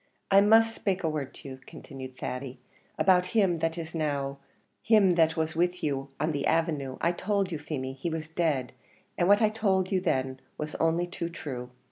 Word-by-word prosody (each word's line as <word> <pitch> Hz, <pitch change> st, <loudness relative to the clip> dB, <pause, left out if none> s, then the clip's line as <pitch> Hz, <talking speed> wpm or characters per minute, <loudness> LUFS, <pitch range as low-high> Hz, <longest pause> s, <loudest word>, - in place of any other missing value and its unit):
"I 195 Hz, 0 st, +8 dB
must 225 Hz, +2 st, +5 dB
spake 190 Hz, -4 st, -2 dB
a 160 Hz, -, +1 dB
word 150 Hz, -4 st, -3 dB
to -, -, -11 dB
you," 130 Hz, 0 st, -9 dB
continued 130 Hz, -2 st, -10 dB
Thady, 125 Hz, +1 st, -5 dB, 0.4 s
"about 180 Hz, -1 st, +4 dB
him 185 Hz, -6 st, +3 dB
that 165 Hz, +1 st, -1 dB
is 160 Hz, -1 st, -6 dB
now 140 Hz, -3 st, -2 dB, 0.4 s
him 210 Hz, -5 st, +5 dB
that 160 Hz, -2 st, +3 dB
was 160 Hz, 0 st, -1 dB
with 175 Hz, +2 st, 0 dB
you 140 Hz, -2 st, -1 dB
on 155 Hz, +3 st, +1 dB
the 140 Hz, -2 st, -1 dB
avenue. 155 Hz, -5 st, 0 dB
I 170 Hz, -, +2 dB
told 195 Hz, +1 st, -1 dB
you, 160 Hz, -, -3 dB
Feemy, 135 Hz, -3 st, -4 dB
he 135 Hz, +6 st, -4 dB
was 160 Hz, -1 st, -4 dB
dead, 160 Hz, -6 st, 0 dB, 0.4 s
and 175 Hz, -, +1 dB
what 205 Hz, +2 st, +5 dB
I 215 Hz, -, +5 dB
told 195 Hz, -4 st, 0 dB
you 190 Hz, -2 st, +2 dB
then 130 Hz, -6 st, -1 dB, 0.2 s
was 150 Hz, 0 st, -5 dB
only 165 Hz, +2 st, +2 dB
too 175 Hz, -1 st, -5 dB
true. 130 Hz, -7 st, -6 dB
160 Hz, 195 wpm, -28 LUFS, 140-180 Hz, 0.4 s, I